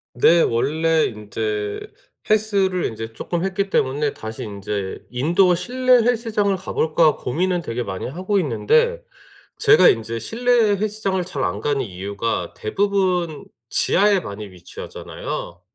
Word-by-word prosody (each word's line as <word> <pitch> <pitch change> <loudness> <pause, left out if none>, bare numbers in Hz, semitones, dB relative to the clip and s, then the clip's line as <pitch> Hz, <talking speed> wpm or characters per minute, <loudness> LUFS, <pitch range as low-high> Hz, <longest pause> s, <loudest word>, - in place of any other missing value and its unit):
네. 165 +7 +5
원래 160 +7 +2
인제 105 -1 -3 0.5
헬스를 200 -4 +2
인제 115 0 -5
쪼끔 170 +9 -3
했기 195 +1 -1
때문에 145 +1 +1
다시 110 0 -7
인제' 100 -1 -5
인도어 170 +8 +3
실내 255 +8 +1
헬스장을 225 -4 +1
가 190 0 -7
볼까.' 155 -1 +3
고민은 175 +7 -1
되게 120 -2 -3
많이 95 -4 -5
하고 185 +8 -1
있는데 470 - +2 0.6
제가 440 0 +6
인제 115 0 -1
실내 240 - -1 0.3
헬스장을 200 -2 -1
잘 150 -7 -4
안 100 - -1
가는 145 -2 0
이유가 100 -2 -3
대부분 180 - 0 0.2
지하에 200 0 +3
많이 105 - -7
위치하잖아요. 90 -1 -7
165 Hz, 290 characters per minute, -21 LUFS, -, 0.6 s, 제가